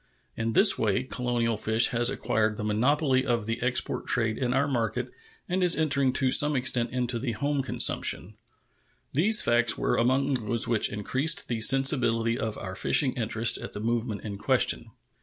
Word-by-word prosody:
In 115 Hz, 0 st, -3 dB
this 195 Hz, -, +4 dB
way 105 Hz, +1 st, 0 dB
colonial 120 Hz, -3 st, -2 dB
fish 110 Hz, +2 st, +3 dB
has 120 Hz, -1 st, +1 dB
acquired 110 Hz, -1 st, -2 dB
the -, -, -5 dB
monopoly 130 Hz, +5 st, 0 dB
of 120 Hz, -4 st, -2 dB
the 115 Hz, +1 st, -4 dB
export 125 Hz, +1 st, -2 dB
trade 115 Hz, -2 st, 0 dB
in 125 Hz, 0 st, -3 dB
our 135 Hz, +2 st, 0 dB
market 125 Hz, -1 st, -3 dB, 0.4 s
and 185 Hz, +1 st, -2 dB
is 180 Hz, -1 st, +4 dB
entering 140 Hz, -4 st, 0 dB
to 130 Hz, -1 st, 0 dB
some 150 Hz, +2 st, +2 dB
extent 125 Hz, -2 st, 0 dB
into 125 Hz, -1 st, -3 dB
the 120 Hz, -1 st, -4 dB
home 140 Hz, +5 st, -2 dB
consumption. 110 Hz, -5 st, +1 dB, 0.8 s
These 205 Hz, +10 st, +4 dB
facts 120 Hz, -1 st, +1 dB
were -, -, -1 dB
among 135 Hz, +4 st, 0 dB
those 115 Hz, -2 st, 0 dB
which 115 Hz, -3 st, +2 dB
increased 130 Hz, +10 st, -1 dB
the 115 Hz, -2 st, -3 dB
sensibility 115 Hz, -2 st, +3 dB
of 110 Hz, -4 st, -5 dB
our 95 Hz, -1 st, -7 dB
fishing 130 Hz, +5 st, +2 dB
interest 115 Hz, -2 st, +1 dB
at -, -, -9 dB
the -, -, -7 dB
movement 115 Hz, -1 st, -3 dB
in 100 Hz, -2 st, -8 dB
question. -, -, +1 dB
120 Hz, 175 wpm, -26 LUFS, 110-135 Hz, 0.8 s, this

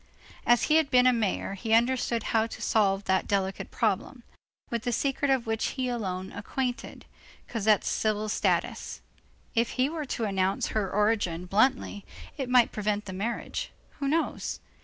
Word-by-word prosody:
As 240 Hz, 0 st, +5 dB
he 310 Hz, -, +4 dB
had 315 Hz, -3 st, +2 dB
been 250 Hz, 0 st, +5 dB
a 255 Hz, -, +6 dB
mayor, 215 Hz, -4 st, -1 dB
he 220 Hz, +3 st, +1 dB
understood 240 Hz, -1 st, +1 dB
how 225 Hz, 0 st, +3 dB
to -, -, -9 dB
solve 200 Hz, -2 st, +2 dB
that 190 Hz, -1 st, +1 dB
delicate 195 Hz, -1 st, -1 dB
problem, -, -, -1 dB, 0.5 s
with 235 Hz, -1 st, -1 dB
the 245 Hz, -, -2 dB
secret 275 Hz, +3 st, 0 dB
of 265 Hz, -3 st, +2 dB
which 225 Hz, 0 st, -1 dB
he 260 Hz, -1 st, 0 dB
alone 190 Hz, -6 st, -3 dB
was -, -, -7 dB
acquainted, 250 Hz, +2 st, -4 dB, 0.4 s
Cosette's 215 Hz, -2 st, +2 dB
civil 215 Hz, 0 st, 0 dB
status. -, -, -1 dB, 0.5 s
If 230 Hz, 0 st, +1 dB
he 260 Hz, +2 st, +3 dB
were 315 Hz, -1 st, -4 dB
to 240 Hz, -, -3 dB
announce 195 Hz, -2 st, 0 dB
her 210 Hz, -3 st, -1 dB
origin 205 Hz, -5 st, +1 dB
bluntly, 210 Hz, +1 st, +1 dB, 0.3 s
it 270 Hz, -4 st, -4 dB
might 250 Hz, -2 st, +5 dB
prevent 210 Hz, 0 st, -1 dB
the 190 Hz, -, -6 dB
marriage, 235 Hz, -, -3 dB, 0.3 s
who 280 Hz, -, -1 dB
knows? 320 Hz, +4 st, -1 dB
225 Hz, 165 wpm, -28 LUFS, 205-255 Hz, 0.5 s, a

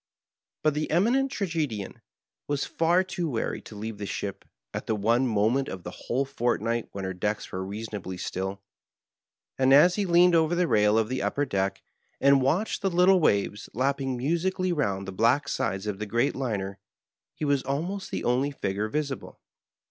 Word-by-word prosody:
But 155 Hz, -1 st, +3 dB
the 150 Hz, +1 st, -2 dB
Eminent 245 Hz, -, +2 dB
Tragedian 160 Hz, -, -3 dB, 0.5 s
was 145 Hz, -1 st, -1 dB
far 170 Hz, +3 st, +2 dB
too 180 Hz, -3 st, -3 dB
wary 115 Hz, -5 st, -2 dB
to 110 Hz, -, -12 dB
leave 105 Hz, 0 st, -6 dB
the 100 Hz, -, -4 dB
ship 100 Hz, -1 st, -5 dB, 0.3 s
at -, -, -5 dB
the 110 Hz, -, +1 dB
one 115 Hz, +5 st, +2 dB
moment 115 Hz, +5 st, +2 dB
of 95 Hz, -2 st, -7 dB
the 90 Hz, -, -6 dB
whole 130 Hz, +8 st, -2 dB
fort 125 Hz, -3 st, 0 dB
night 115 Hz, 0 st, -2 dB
when 100 Hz, -, -6 dB
her 95 Hz, 0 st, -3 dB
decks* 105 Hz, +3 st, -3 dB
were 95 Hz, 0 st, -3 dB
reasonably 100 Hz, -2 st, -5 dB
still, 95 Hz, +2 st, -4 dB, 1.0 s
and 130 Hz, 0 st, +4 dB
as 175 Hz, +6 st, +6 dB
he 200 Hz, -2 st, 0 dB
leaned 175 Hz, +1 st, +5 dB
over 165 Hz, +1 st, +3 dB
the 175 Hz, 0 st, +2 dB
rail 105 Hz, -3 st, +4 dB
of 110 Hz, -1 st, +2 dB
the 130 Hz, +2 st, -2 dB
upper 145 Hz, -, 0 dB
deck 100 Hz, -5 st, -1 dB, 0.4 s
and 140 Hz, 0 st, +5 dB
watched 165 Hz, +12 st, 0 dB
the 195 Hz, -, +1 dB
little 180 Hz, +1 st, +5 dB
waves 105 Hz, -, +1 dB
lapping 135 Hz, 0 st, 0 dB
musically 175 Hz, +6 st, 0 dB
round 100 Hz, -, -1 dB
the -, -, -4 dB
black 120 Hz, +8 st, +2 dB
sides 95 Hz, +1 st, -2 dB
of 105 Hz, -2 st, -3 dB
the 105 Hz, -, -4 dB
great 120 Hz, +7 st, +1 dB
Liner, 100 Hz, -7 st, -3 dB, 0.6 s
he 155 Hz, -, -3 dB
was 140 Hz, -2 st, +2 dB
almost 170 Hz, +10 st, -3 dB
the -, -, -3 dB
only 130 Hz, +4 st, +2 dB
figure 105 Hz, -6 st, -2 dB
visible. 140 Hz, +1 st, -4 dB
130 Hz, 180 wpm, -27 LUFS, 105-160 Hz, 1.0 s, as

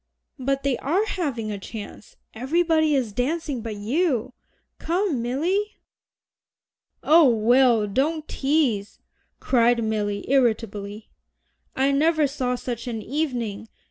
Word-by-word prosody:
"But 275 Hz, +1 st, -1 dB
they 275 Hz, -3 st, 0 dB
are 360 Hz, +10 st, +1 dB
having 270 Hz, -, -3 dB
a 205 Hz, -, -5 dB
chance. 210 Hz, +1 st, -9 dB, 0.2 s
Everybody 315 Hz, +4 st, +1 dB
is 245 Hz, -6 st, -1 dB
dancing 280 Hz, +1 st, -2 dB
but 220 Hz, -1 st, -5 dB
you. 255 Hz, -, -1 dB, 0.5 s
Come, 340 Hz, -, 0 dB
Milly." 350 Hz, -, -1 dB, 1.3 s
"Oh, 315 Hz, -3 st, +6 dB
Will, 235 Hz, 0 st, +4 dB
don't 295 Hz, +9 st, -1 dB
tease," 270 Hz, -8 st, 0 dB, 0.4 s
cried 240 Hz, -2 st, +2 dB
Milly 205 Hz, -2 st, -2 dB
irritably. 215 Hz, -5 st, -1 dB, 0.6 s
"I 270 Hz, +1 st, +2 dB
never 310 Hz, +2 st, +3 dB
saw 260 Hz, -3 st, -1 dB
such 240 Hz, -1 st, -5 dB
an 225 Hz, -3 st, -4 dB
evening. 240 Hz, -7 st, -3 dB
255 Hz, 110 wpm, -24 LUFS, 225-305 Hz, 1.3 s, Oh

